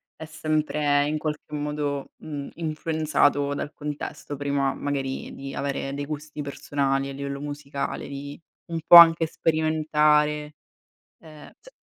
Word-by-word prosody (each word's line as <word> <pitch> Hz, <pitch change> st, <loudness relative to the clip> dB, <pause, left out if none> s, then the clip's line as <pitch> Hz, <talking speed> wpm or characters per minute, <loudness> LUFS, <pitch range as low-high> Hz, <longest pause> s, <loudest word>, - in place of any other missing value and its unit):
è 160 Hz, -, -8 dB
sempre 150 Hz, -2 st, 0 dB
in 155 Hz, 0 st, -1 dB
qualche 150 Hz, 0 st, -5 dB
modo, 145 Hz, -1 st, -3 dB
uhm, 145 Hz, -2 st, -6 dB
influenzato 155 Hz, -3 st, +1 dB
dal 145 Hz, +1 st, -4 dB
contesto, 145 Hz, -1 st, -6 dB
prima 140 Hz, -1 st, 0 dB
magari 135 Hz, -2 st, -3 dB
di 135 Hz, 0 st, -7 dB
avere 140 Hz, 0 st, -3 dB
dei 145 Hz, 0 st, -4 dB
gusti 150 Hz, 0 st, -6 dB
personali 140 Hz, -1 st, -1 dB
a -, -, -6 dB
livello 140 Hz, 0 st, -5 dB
musicale, 145 Hz, -1 st, -5 dB
di 140 Hz, +2 st, -8 dB, 0.3 s
un 165 Hz, -, -1 dB
po' 175 Hz, -, +9 dB
anche 165 Hz, -1 st, +9 dB
sperimentare, 150 Hz, -2 st, +1 dB, 0.7 s
ehm, 155 Hz, -2 st, -13 dB
cioè -, -, -16 dB
150 Hz, 130 wpm, -25 LUFS, 140-155 Hz, 0.7 s, po